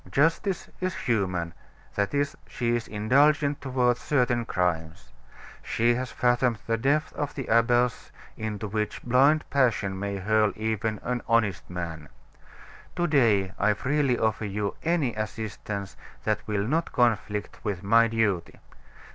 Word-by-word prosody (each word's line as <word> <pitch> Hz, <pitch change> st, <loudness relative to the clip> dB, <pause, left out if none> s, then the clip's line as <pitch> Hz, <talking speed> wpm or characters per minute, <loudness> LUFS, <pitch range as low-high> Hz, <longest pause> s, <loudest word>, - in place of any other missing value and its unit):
Justice 165 Hz, +6 st, +1 dB
is 185 Hz, 0 st, -2 dB
human; 90 Hz, -, -1 dB, 0.4 s
that 100 Hz, 0 st, 0 dB
is, 145 Hz, 0 st, 0 dB
she 120 Hz, -1 st, -1 dB
is 120 Hz, -, -3 dB
indulgent 140 Hz, +7 st, +2 dB
toward 125 Hz, -3 st, +1 dB
certain 125 Hz, -4 st, +1 dB
crimes. 90 Hz, -2 st, -2 dB, 0.5 s
She 120 Hz, +1 st, +1 dB
has 125 Hz, +1 st, -3 dB
fathomed 120 Hz, -1 st, +2 dB
the 115 Hz, -, +1 dB
depth 140 Hz, +7 st, +1 dB
of 145 Hz, -1 st, -4 dB
the 135 Hz, -, -4 dB
abyss 120 Hz, +1 st, +2 dB, 0.2 s
into 110 Hz, -1 st, -4 dB
which 105 Hz, +1 st, -3 dB
blind 135 Hz, +5 st, +3 dB
passion 115 Hz, -8 st, +1 dB
may 100 Hz, 0 st, -3 dB
hurl 105 Hz, +2 st, +2 dB
even 110 Hz, -1 st, -2 dB
an 125 Hz, 0 st, -2 dB
honest 110 Hz, -5 st, +1 dB
man. 85 Hz, -4 st, -6 dB, 0.9 s
To 175 Hz, -, +1 dB
day 115 Hz, -, +3 dB
I 105 Hz, +1 st, +3 dB
freely 135 Hz, +1 st, +1 dB
offer 110 Hz, 0 st, 0 dB
you 100 Hz, 0 st, -2 dB
any 165 Hz, -7 st, +1 dB
assistance 105 Hz, -2 st, -5 dB, 0.3 s
that -, -, -1 dB
will 105 Hz, -1 st, 0 dB
not 160 Hz, +5 st, 0 dB
conflict 110 Hz, -3 st, 0 dB
with 100 Hz, -4 st, -3 dB
my 115 Hz, +3 st, +5 dB
duty. 105 Hz, -6 st, 0 dB
115 Hz, 140 wpm, -26 LUFS, 100-130 Hz, 0.9 s, my